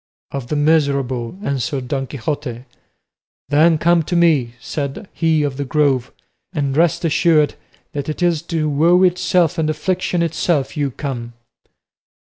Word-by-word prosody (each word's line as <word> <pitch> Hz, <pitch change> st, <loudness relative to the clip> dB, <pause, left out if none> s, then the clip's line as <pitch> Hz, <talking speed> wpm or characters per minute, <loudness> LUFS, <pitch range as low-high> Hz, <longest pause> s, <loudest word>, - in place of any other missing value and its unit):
"Of 135 Hz, -3 st, -5 dB
the 150 Hz, -, -2 dB
miserable," 140 Hz, -4 st, +1 dB
answered 135 Hz, -, -2 dB
Don 135 Hz, 0 st, -2 dB
Quixote. 135 Hz, -2 st, -4 dB, 0.9 s
"Then 155 Hz, +3 st, +4 dB
come 170 Hz, +2 st, +3 dB
to 170 Hz, +3 st, -3 dB
me," 150 Hz, -9 st, +3 dB
said 140 Hz, +7 st, -5 dB
he 160 Hz, -2 st, +1 dB
of 140 Hz, -2 st, -2 dB
the 145 Hz, -, -2 dB
Grove, 135 Hz, -3 st, +1 dB, 0.4 s
"and 140 Hz, -4 st, -1 dB
rest 170 Hz, +2 st, +2 dB
assured 155 Hz, -2 st, +3 dB, 0.4 s
that 145 Hz, 0 st, -4 dB
it 155 Hz, +3 st, -3 dB
is 170 Hz, -3 st, +2 dB
to 160 Hz, -2 st, 0 dB
woe 165 Hz, +5 st, +4 dB
itself 180 Hz, -1 st, +2 dB
and 155 Hz, -1 st, +1 dB
affliction 175 Hz, +2 st, -1 dB
itself 165 Hz, -3 st, 0 dB
you 145 Hz, -2 st, 0 dB
come." 120 Hz, -3 st, -5 dB
150 Hz, 140 wpm, -19 LUFS, 135-170 Hz, 0.9 s, Then